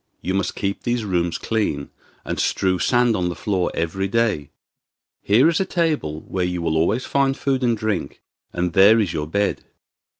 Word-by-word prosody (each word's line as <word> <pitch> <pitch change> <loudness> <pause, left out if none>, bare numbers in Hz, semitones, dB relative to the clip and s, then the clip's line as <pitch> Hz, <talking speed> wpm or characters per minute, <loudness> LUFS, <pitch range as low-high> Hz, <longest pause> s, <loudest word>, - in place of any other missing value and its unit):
You 95 - -1
must 95 0 -1
keep 100 0 -3
these 120 -2 -1
rooms 90 -3 0
clean, 100 -11 -2 0.3
and - - -3
strew 95 -1 +1
sand 120 +1 +3
on 90 -3 0
the 90 - -4
floor 90 +1 -1
every 90 +4 -1
day. 105 -9 0 0.7
Here 115 +9 +4
is 165 -1 +2
a - - +2
table 155 - -1
where 95 -1 -3
you 90 0 -2
will 80 -2 -1
always 100 +10 +1
find 135 -1 +1
food 135 -2 -1
and 120 -2 +2
drink, 105 -9 -3 0.3
and 90 -1 -2
there 100 +5 +6
is 95 -6 0
your 75 -2 -3
bed. 100 +5 -1
100 Hz, 180 wpm, -22 LUFS, 85-115 Hz, 0.7 s, there